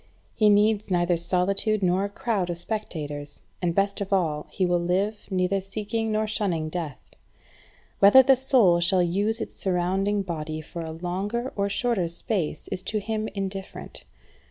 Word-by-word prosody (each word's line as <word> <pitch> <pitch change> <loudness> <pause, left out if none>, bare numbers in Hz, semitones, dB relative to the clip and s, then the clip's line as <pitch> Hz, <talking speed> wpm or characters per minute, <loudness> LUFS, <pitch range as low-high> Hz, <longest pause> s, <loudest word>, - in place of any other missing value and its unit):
He 215 -1 +4
needs 210 0 +3
neither 175 -1 +2
solitude 195 +5 +1
nor 185 +2 +2
a 200 - -2
crowd 205 -5 -1
of 175 - -2
spectators; 150 -8 -4 0.2
and, 170 -2 0
best 200 0 +1
of 200 - -4
all, 160 -6 0
he 185 - 0
will 175 -1 +2
live 195 +5 -1
neither 190 0 +1
seeking 215 +3 -3
nor 215 0 +1
shunning 185 -7 -1
death. 155 -5 -4 1.0
Whether 205 +7 +8
the 270 +1 +6
soul 245 -9 +4
shall 175 +1 +3
use 205 +6 0
its - - -6
surrounding 195 +2 0
body 155 -3 -4
for 165 +2 -7
a 160 - -5
longer 190 +9 -3
or 200 0 0
shorter 205 -4 0
space 170 0 -3
is 185 - -3
to 215 - -2
him 215 +1 -2
indifferent. 195 - -5
195 Hz, 160 wpm, -26 LUFS, 175-210 Hz, 1.0 s, Whether